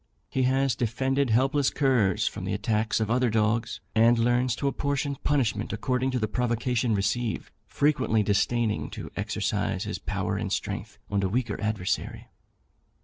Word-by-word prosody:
He 130 -1 +1
has 135 0 +2
defended 130 +3 0
helpless 135 +4 +3
curs 115 -7 +2
from 100 - -4
the 95 +2 -1
attacks 110 +1 0
of 110 0 -1
other 125 0 +3
dogs, 110 +1 0
and 115 +2 +5
learns 120 +1 +2
to 140 - -2
apportion 140 0 -1
punishment 120 -7 0
according 125 +4 0
to 130 - -1
the 110 -3 0
provocation 120 0 0
received, 105 +4 -1 0.2
frequently 130 -7 +2
disdaining 110 +2 +1
to - - -7
exercise - - -1
his - - -4
power - - -2
and - - -3
strength - - -3
on 100 -1 +1
a 95 - 0
weaker 115 0 -1
adversary. 105 -4 -2
120 Hz, 150 wpm, -27 LUFS, 110-130 Hz, 0.2 s, and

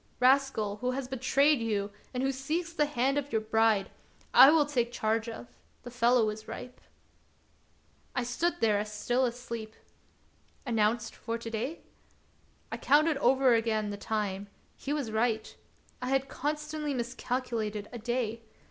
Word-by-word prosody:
Rascal, 255 -5 +3
who 250 +4 -2
has 265 -1 -3
betrayed 270 +3 +3
you, 210 -3 -1 0.2
and 250 0 -2
who 270 - +2
seeks 315 +6 -3
the 300 -3 +2
hand 275 0 +1
of 285 0 -7
your 220 - +2
bride, 220 -2 +2 0.4
I 270 - +10
will 305 -1 +5
take 245 -5 0
charge 225 0 0
of; 120 - -7 0.4
the 245 - -8
fellow 240 -2 +3
is 215 +1 -10
ripe." 250 0 -8 1.3
I 250 - +1
stood 340 +9 -1
there 210 -2 +3
as 210 0 -4
still 245 +5 +1
asleep. 235 -2 -5 0.5
" - - -36
Announced 225 -1 +1
for 230 0 -4
to 230 0 -7
day 250 +9 -3 0.3
} - - -36
" - - -36
I - - -3
counted 300 +1 +3
over 265 -1 +4
again 220 -2 +1
the - - -4
time; 200 -1 -3 0.3
he 280 - -5
was 285 -7 -2
right. 220 0 0 0.5
I 250 - -3
had 270 0 +1
constantly 300 +1 -3
miscalculated 235 -3 -3
a 240 - -5
day. 230 -1 -2
240 Hz, 160 wpm, -30 LUFS, 220-270 Hz, 1.3 s, I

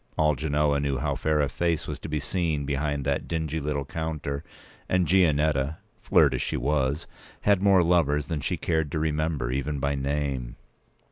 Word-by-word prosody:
All 75 0 +4
Genoa 75 0 +1
knew 70 -1 0
how - - -1
fair 75 -1 +1
a 70 - +2
face 85 +3 -1
was - - -5
to - - -7
be 75 0 -1
seen 80 -2 -1
behind 70 0 -1
that 70 -1 -1
dingy 80 -1 -2
little 70 -1 -2
p. 80 - -7
194counter; 75 -3 -3 0.5
and 90 -1 +2
Gianetta, 80 -5 +2 0.2
flirt - - +4
as - - -1
she - - -1
was, 70 +3 0 0.4
had 100 -2 +3
more 95 -3 +5
lovers 75 -4 +2
than 75 -1 -3
she - - -1
cared 80 -3 -1
to - - 0
remember, 75 -4 -1
even 70 +3 -2
by 70 +1 0
name. 70 -3 -2
75 Hz, 185 wpm, -26 LUFS, 70-80 Hz, 0.5 s, more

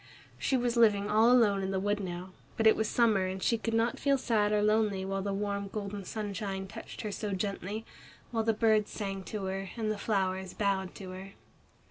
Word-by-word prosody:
She 265 - +1
was 240 -1 0
living 210 -3 +4
all 220 +3 +5
alone 215 -6 +4
in 190 - -2
the 190 -1 0
wood 205 +1 0
now, 180 -1 -5 0.3
but 225 - +1
it 220 - +7
was 220 - 0
summer 215 -6 +3
and 190 0 -4
she 235 - +3
could 225 0 -1
not 230 +1 +1
feel 280 -1 +3
sad 215 -5 +1
or 210 0 +2
lonely 210 -3 +2
while 195 0 -2
the 200 +1 -2
warm 200 0 -2
golden 200 -1 -5
sunshine 200 -2 -4
touched 220 +4 -9
her 215 - -3
so 205 0 -3
gently, 200 +2 -3 0.5
while 225 -2 0
the 225 - +3
birds 220 -1 +2
sang 195 -2 -4
to 210 -2 -4
her, 190 0 -3
and 220 -2 0
the 210 - -3
flowers 190 -3 -1
bowed 195 -3 0
to 190 -2 -8
her. 190 +1 -9
205 Hz, 210 wpm, -31 LUFS, 195-220 Hz, 0.5 s, it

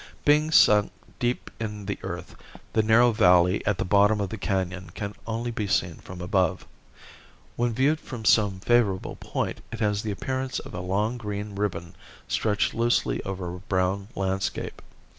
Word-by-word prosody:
Being 150 +1 +4
sunk 105 -9 +5 0.3
deep 120 -1 -1
in 105 -2 -5
the 100 - -3
earth - - -6 0.4
the 110 - +4
narrow 115 +3 +5
valley 90 -3 +4
at 105 -3 +2
the - - -1
bottom 105 +2 +4
of 100 -2 -1
the 110 - -5
canon 95 -2 -2
can 100 0 -4
only 115 +1 -2
be 110 -3 -3
seen 85 -3 0
from 90 -1 -10
above. 90 0 0 0.9
When 120 0 +1
viewed 140 +6 +2
from 120 -8 -8
some 100 -3 +3
favorable 110 -5 +1
point - - -3
it 115 - -6
has 105 -2 +1
the 110 - -4
appearance 130 +5 -3
of - - -7
a 90 - -4
long 105 +7 -1
green 105 -1 -5
ribbon 95 -3 -3 0.3
stretched 105 -2 0
loosely 120 +1 +1
over 90 -2 -4
a 90 - -7
brown 95 +1 -1
landscape. 95 0 -2
105 Hz, 165 wpm, -26 LUFS, 95-115 Hz, 0.9 s, sunk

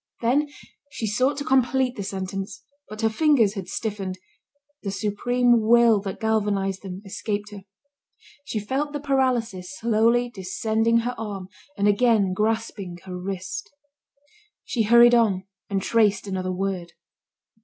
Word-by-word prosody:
Then 265 +6 +2 0.4
she 230 - -4
sought 255 +7 +1
to 285 - -3
complete 260 -2 +2
the 205 - -5
sentence, 195 +1 -5 0.3
but 215 +1 -7
her 225 - +3
fingers 235 -4 +3
had 195 -4 -6
stiffened, 195 -2 -4 0.6
the 200 - -4
supreme 235 +4 +2
will 230 -1 +5
that 195 -1 -6
galvanised 205 -3 0
them, 190 0 -8
escaped 205 +1 -4
her. 200 -2 -10 0.8
She 225 - -3
felt 270 +8 -2
the 290 - -2
paralysis 240 -10 -1
slowly 235 +2 +2
descending 220 +3 0
her 245 +2 -2
arm 200 -4 -5 0.3
and 200 - +2
again 205 -3 +3
grasping 210 -3 -2
her 185 -1 -7
wrist. 185 +1 -5 0.9
She 235 - -1
hurried 235 +2 +7
on, 205 -6 +3 0.2
and 195 -2 -1
traced 215 -3 +2
another 185 -2 -3
word. 185 -2 -3
215 Hz, 135 wpm, -24 LUFS, 195-235 Hz, 0.9 s, hurried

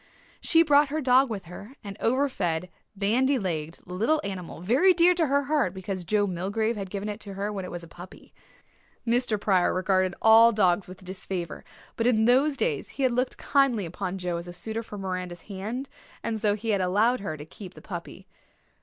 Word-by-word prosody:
She 330 0 +4
brought 295 -2 +4
her 305 +2 -1
dog 260 -1 +4
with 200 -5 -5
her 200 +9 -11
an 200 -1 -7
over 260 +5 +2
fed, 175 -7 -2 0.2
bandy 245 +8 +2
legged 165 -6 -3
little 220 - +1
animal 190 -5 -6
very 260 - +4
dear 350 +1 +6
to 335 -3 +1
her 280 +1 +2
heart 275 - 0
because 190 -1 -4
Joe 210 +2 +2
Milgrave 200 +5 -1
had 195 -2 -5
given 200 +2 -4
it 210 0 -4
to 200 -3 -9
her 205 +2 -3
when 195 -2 -4
it - - -7
was 175 -1 -7
a - - -10
puppy. 175 +2 -13 0.7
Mr. 235 -2 +1
Pryor 190 -4 +2
regarded 185 -1 +1
all 225 +1 +7
dogs 190 -3 +2
with 185 +1 -12
disfavour; 185 -2 -5 0.3
but 230 - +1
in 220 -3 +3
those 275 +4 +3
days 460 - -1
he 275 - -4
had 260 - +3
looked 250 +2 -1
kindly 270 -8 +2
upon 185 +2 -4
Joe 180 -2 -2
as 170 +1 -7
a 175 - -7
suitor 220 +6 -4
for 215 -2 -9
Miranda's 185 -2 -5
hand 215 +7 -5 0.4
and 220 -2 -2
so 205 -2 +2
he 220 +2 -5
had 200 -3 +2
allowed 210 +7 +2
her 160 -6 -5
to 150 - -9
keep 185 +3 -11
the - - -11
puppy. - - -8
205 Hz, 205 wpm, -26 LUFS, 185-250 Hz, 0.7 s, all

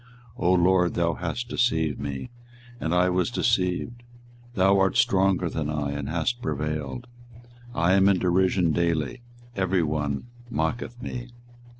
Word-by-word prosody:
24:020:007 120 - -5
O 90 - +5
LORD, 90 0 +3
thou 85 -1 +1
hast 90 +9 -4
deceived 80 - 0
me, 70 - -5 0.5
and 80 - -2
I 90 +1 +4
was 90 +3 +1
deceived; 115 0 0 0.5
thou 95 +1 +4
art 95 -1 +2
stronger 95 -2 +3
than 75 -2 -3
I, 75 -2 -2
and 70 -1 -4
hast 85 +10 -1
prevailed: 75 - -3 0.7
I 85 +2 +3
am 95 0 +5
in 100 - +4
derision 90 -1 +2
daily, 85 - 0 0.3
every 95 -2 +1
one 75 -2 -2 0.3
mocketh 120 +5 -2
me. 125 0 -5
90 Hz, 140 wpm, -25 LUFS, 80-95 Hz, 0.7 s, O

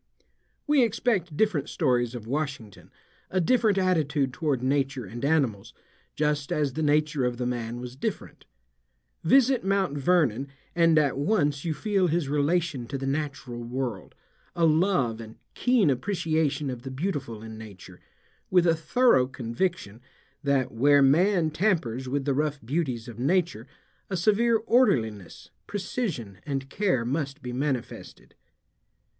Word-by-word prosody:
We 295 -2 +4
expect 205 -8 0
different 200 -11 +1
stories 125 -6 0
of 115 -3 -7
Washington, 135 -6 -4 0.4
a 185 - 0
different 215 +2 +2
attitude 155 -8 +1
toward 145 -7 -1
nature 135 -2 0
and 115 +5 -8
animals, 135 -10 0 0.4
just 150 -2 -1
as 145 -3 0
the 160 - -3
nature 150 -2 +1
of 125 -1 -1
the 125 - -2
man 120 -1 -3
was 125 0 -8
different. 135 - -5 0.8
Visit 260 +7 +4
Mt. 190 -7 0
Vernon 140 -5 +2 0.3
and 165 -2 +4
at 140 -3 +2
once 145 -5 +1
you 160 -2 -1
feel 195 +2 +1
his 165 -3 0
relation 150 -2 0
to 135 - -4
the 135 - -5
natural 135 -4 -3
world, 120 -5 -4 0.4
a 170 -1 +3
love 155 - +2
and 110 0 -11 0.2
keen 240 - +3
appreciation 155 -2 -1
of 125 -2 -7
the 135 - -7
beautiful 130 - -4
in 110 0 -8
nature, 95 -4 -12 0.5
with 180 -2 +4
a 165 - +5
thorough 165 - +3
conviction 120 - -3 0.4
that 135 -2 +1
where 140 +5 +4
man 165 +4 +3
tampers 150 - 0
with 140 0 -1
the 140 - +1
rough 150 +1 -1
beauties 130 -4 -2
of 120 -1 -9
nature 155 - 0 0.4
a 190 - -2
severe 220 +5 +3
orderliness, 120 - 0 0.2
precision, 185 - -4
and 135 -1 -4
care 185 - 0
must 140 +2 -3
be 125 -1 -5
manifested. 130 -2 -4
145 Hz, 140 wpm, -26 LUFS, 125-175 Hz, 0.8 s, a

